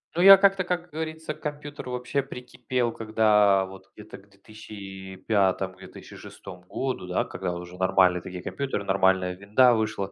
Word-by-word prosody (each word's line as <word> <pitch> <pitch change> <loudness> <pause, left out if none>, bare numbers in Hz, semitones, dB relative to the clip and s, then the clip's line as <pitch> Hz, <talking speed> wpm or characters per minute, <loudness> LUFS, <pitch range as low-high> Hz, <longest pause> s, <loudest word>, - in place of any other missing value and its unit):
Ну, 175 - +1
я 195 +1 +10
как-то, 195 -1 +3
как 175 -1 -3
говорится, 160 0 -5
к - - -20
компьютеру 145 -3 -7
вообще 125 +2 -2
прикипел, 125 -1 -4
когда 105 -3 +2
вот 95 0 -13
где-то 105 0 -11
к 100 +1 -21
2005-2006 95 -2 -5
году, 130 -9 -4
да, 90 - 0
когда 90 -1 -5
уже 90 +1 -9
нормальные 90 -1 +3
такие 90 0 -8
компьютеры, 135 -1 -4
нормальная 95 -2 +1
"Винда" 105 +6 +3
вышла. 110 -3 -2
105 Hz, 140 wpm, -25 LUFS, 95-130 Hz, -, я